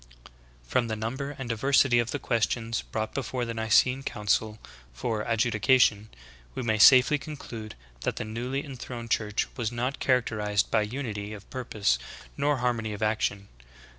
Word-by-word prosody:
From 115 - 0
the 110 - -2
number 130 +6 -4
and 135 - -5
diversity 125 +1 +3
of 120 0 0
the 145 - -2
questions 115 -2 -1
brought 110 0 -4
before 130 -2 -2
the 115 - -4
Nicene 115 +4 +3
Council 105 -3 -1 0.3
for 115 -4 -2
ad 115 -2 +1
judication, 110 -1 +3 0.5
we - - -3
may 110 -2 0
safely 130 +5 +7
conclude 125 -6 -8 0.2
that - - -2
the - - -4
newly 125 +6 -3
enthroned 120 -4 -7
Church 105 -1 +1
was 120 -3 -2
not 125 +3 -2
characterized 105 -5 +1
by 110 - +3
unity 105 -3 -4
of 100 -2 -11
purpose 105 - 0 0.4
nor 145 0 +1
har 125 -1 +1
mony 110 -2 -4
of 105 - -4
action. 105 -2 0
115 Hz, 160 wpm, -27 LUFS, 110-130 Hz, 0.5 s, safely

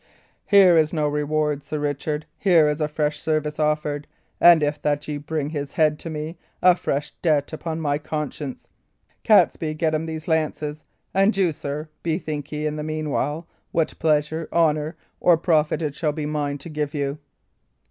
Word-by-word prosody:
"Here 195 -4 +7
is 155 -1 +3
no 155 -3 0
reward, 150 0 0
Sir 155 - -5
Richard; 150 +1 -2
here 170 -6 +4
is 150 +1 -1
fresh 150 -1 -1
service 155 -1 -1
offered, 150 -1 0 0.3
and, 170 -3 +7
if 145 0 -1
that 145 0 -1
ye 150 -1 -3
bring 150 0 -3
his 145 -3 -4
head 155 -1 +2
to 165 - -6
me, 160 +2 -5 0.2
a 180 -1 +6
fresh 145 -4 -2
debt 150 -3 +1
upon 160 0 -4
my 145 -2 0
conscience. 150 -3 -5 0.6
Catesby, 155 -1 +3
get 160 0 0
him 155 +1 -1
these 160 -1 -6
lances; 155 -2 -1 0.3
and 195 +2 +3
you, 180 -4 +2
sir, 145 +2 -5
bethink 155 -3 -3
ye, 150 0 -3
in 150 0 -2
the 150 - -3
meanwhile, 155 +1 -2 0.2
what 165 -2 0
pleasure, 155 +1 +1
honour, 155 -1 +1 0.2
or 175 -2 +5
profit 160 -1 +1
it 150 -2 -2
shall 150 +1 -1
be 150 -1 -4
mine 145 -1 -2
to 145 +4 -9
give 150 -1 -3
you." 140 0 -2
150 Hz, 170 wpm, -23 LUFS, 150-160 Hz, 0.6 s, Here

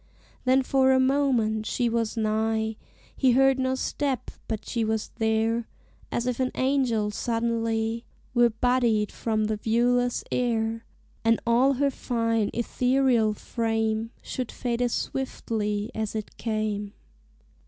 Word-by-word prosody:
Then 260 +1 +4
for 265 0 +3
a 260 - +4
moment 255 -5 +2
she 245 - 0
was 230 -1 -1
nigh, 220 0 0 0.4
He 260 -3 +3
heard 270 +1 +4
no 260 0 +1
step, 265 -2 -2 0.2
but 220 -2 -4
she 235 -2 -1
was 220 0 -1
there; 225 +1 +1 0.4
As 235 - -1
if 250 -1 -1
an 255 -1 +1
angel 255 -6 +1
suddenly 230 0 -1 0.3
Were 240 -1 +5
bodied 230 -2 +1
from 215 -2 -1
the 215 0 -1
viewless 245 +3 +1
air, 225 -2 0 0.4
And 225 0 +3
all 245 +4 +4
her 280 +1 +1
fine 230 -4 0
ethereal 245 -2 +2
frame 225 0 -1
Should 255 -3 -4
fade 240 -1 -2
as 245 -1 +1
swiftly 215 -5 -2
as 220 -1 -3
it 215 -1 -5
came. 215 -2 -2
230 Hz, 130 wpm, -26 LUFS, 220-250 Hz, 0.4 s, Were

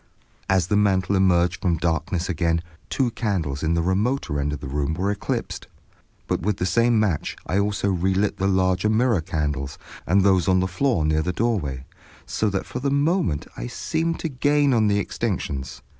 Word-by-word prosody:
As 95 -2 +3
the 105 - 0
mantel 100 -2 +2
emerged 90 -1 +2
from 85 -2 +1
darkness 85 +2 -1
again, 85 -1 0 0.3
two 130 -3 0
candles 90 - -2
in 80 +1 +1
the 85 - +1
remoter 95 - 0
end 70 +1 -1
of 75 - -4
the 70 - -7
room 75 +3 -1
were 95 +4 0
eclipsed. 105 - -4 0.6
But - - -1
with 100 +3 0
the 90 - -1
same 115 +3 +3
match 95 -8 0
I 90 +5 0
also 100 -1 0
relit 95 +3 0
the 95 - 0
larger 95 +1 +2
mirror 110 -3 +2
candles, 75 -4 -3 0.3
and 95 +3 +4
those 95 -2 +3
on 95 -1 +4
the 95 - +1
floor 95 - 0
near 75 0 +2
the 90 - -1
doorway, 85 - -1 0.4
so 110 - 0
that 95 -1 -2
for 125 - -5
the 140 +2 0
moment 145 - +1
I - - -5
seemed 165 - -2
to - - -1
gain 145 0 +2
on 110 -3 +3
the 100 0 +2
extinctions. 80 - -3
95 Hz, 190 wpm, -23 LUFS, 80-110 Hz, 0.6 s, and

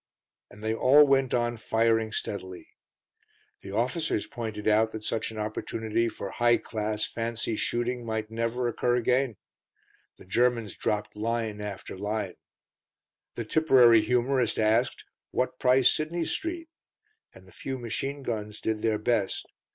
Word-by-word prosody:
And 105 +1 -14
they 110 0 0
all 135 +6 +6
went 135 -2 +3
on 120 -1 0
firing 115 0 +1
steadily. 95 -4 -5 0.9
The 100 - -9
officers 130 +9 0
pointed 110 -4 -5
out 110 +1 +3
that 110 - -6
such 110 +1 -2
an 110 - -9
opportunity 110 +1 -1
for 100 -3 -6
high 120 -1 +3
class, 105 -1 -2
fancy 115 -1 -3
shooting 120 +2 -1
might 110 -1 -3
never 115 +2 -1
occur 120 +1 +1
again; 125 -1 +1 0.8
the - - -15
Germans 115 0 +1
dropped 105 -2 -2
line 110 -1 -2
after 105 -2 -6
line; 105 -1 -3 1.0
the 115 - -4
Tipperary 125 -5 +6
humorist 125 0 +1
asked, 110 +3 +1 0.2
"What 130 0 -1
price 130 0 +5
Sidney 165 +2 -2
Street?" 330 0 -3 0.7
And - - -16
the - - -16
few 135 -1 -5
machine 135 +4 -4
guns 105 -3 -4
did 110 -1 -2
their 110 -1 +1
best. 105 -2 0
115 Hz, 140 wpm, -28 LUFS, 110-125 Hz, 1.0 s, all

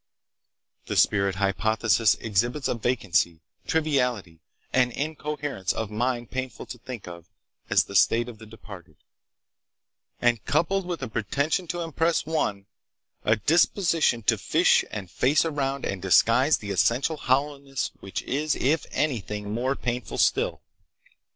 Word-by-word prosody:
"The - - -3
spirit 100 -2 +3
hypothesis 110 +2 +2
exhibits 120 +7 -1
a - - 0
vacancy, 105 -8 0 0.3
triviality, 125 - 0 0.3
and 125 -1 +3
incoherence 145 - -3
of 110 -2 -4
mind 120 +1 -2
painful 130 0 -5
to 125 - -9
think 120 -4 -8
of 85 -1 -9 0.4
as - - +4
the - - -10
state 120 +1 +4
of 115 -3 -10
the 110 - -12
departed, 100 -7 -12 1.2
and 120 -3 +2
coupled 175 +5 0
with 170 -6 -4
a - - -2
pretension 140 - -1
to 175 +1 -3
impress 165 0 0
one, 125 -11 -1 0.6
a 110 - +3
disposition 165 - +2
to - - +2
'fish' - - +3
and 95 -4 -7
face 145 +6 +2
around 140 -3 -2
and 95 -2 -3
disguise 115 - +4
the 100 -2 -6
essential 115 - +1
hollowness 140 0 -1
which 95 -2 -5
is, 150 +2 -1
if 145 +4 0
anything, 105 -7 -2
more 130 +4 0
painful 120 -3 -4
still. - - +1
125 Hz, 135 wpm, -26 LUFS, 105-145 Hz, 1.2 s, as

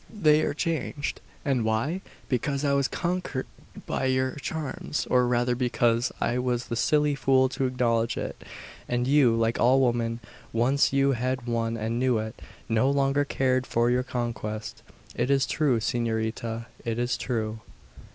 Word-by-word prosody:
They 155 -8 +4
are 145 - -1
changed, 155 -3 -2 0.2
and 135 -5 +1
why? 115 +12 0 0.3
Because 140 +3 -1
I 140 - +2
was 140 -1 +2
conquered 175 -6 -2 0.4
by - - -1
your 130 0 +1
charms, 150 0 -3
or 125 -1 +4
rather 120 0 +2
because 120 -1 +1
I 120 +1 0
was 125 -1 -1
the 115 - -1
silly 150 +4 +2
fool 130 -1 +3
to 135 0 -1
acknowledge 120 -2 0
it; - - -5 0.5
and 120 0 0
you, 135 -4 +4
like 115 0 +1
all 130 +3 +5
women, 120 -2 +1 0.3
once 125 +5 +3
you 140 0 +3
had 130 0 -1
won 115 -1 -1
and 115 +2 -2
knew 125 -2 +2
it, 110 0 -5 0.3
no 115 +3 +2
longer 140 0 +2
cared 130 -2 0
for 120 +1 +2
your 125 +1 +2
conquest. 115 -4 -4 0.3
It 120 +2 0
is 135 -1 +3
true, 140 -7 +1
S'norita; 115 0 -2 0.2
it 115 -1 -2
is 120 +1 0
true." 110 -3 -2
125 Hz, 160 wpm, -27 LUFS, 115-135 Hz, 0.5 s, all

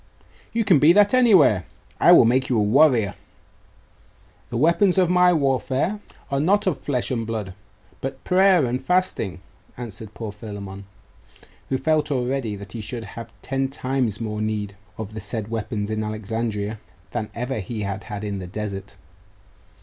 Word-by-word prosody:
'You 230 -1 0
can 180 -8 +5
be 155 +4 +6
that 205 +2 +5
anywhere. 190 - +5 0.4
I - - +6
will - - +8
make 130 +3 +2
you 125 - +2
a 105 - +3
warrior.' 115 -2 +4 1.4
'The 120 - -3
weapons 170 - +3
of 180 -2 +3
my 180 0 +5
warfare 140 +5 0 0.3
are 140 - +1
not 190 +8 +2
of 170 -8 0
flesh 130 -2 -2
and 115 -3 -2
blood, 105 -5 -4 0.5
but 135 0 -5
prayer 185 -4 +4
and 125 +1 -2
fasting,' 180 - 0 0.4
answered 110 -3 -8
poor 110 -3 -5
Philammon, 100 -2 -8 0.8
who 130 - +1
felt 150 +2 +1
already 130 -4 -1
that 100 0 -10
he 115 - -6
should 115 +2 -5
have 115 0 -8
ten 135 0 -1
times 130 -5 -2
more 105 -2 -3
need 105 -2 -2 0.2
of 110 -1 -6
the 110 - -6
said 105 +1 -4
weapons 110 -2 -3
in 110 0 -1
Alexandria 110 0 -3 0.3
than 105 +4 -3
ever 125 +1 -3
he 105 +3 -5
had 100 -1 -4
had 105 -1 -6
in 100 -2 -3
the 90 - -6
desert.... 100 0 -6
115 Hz, 165 wpm, -23 LUFS, 105-145 Hz, 1.4 s, will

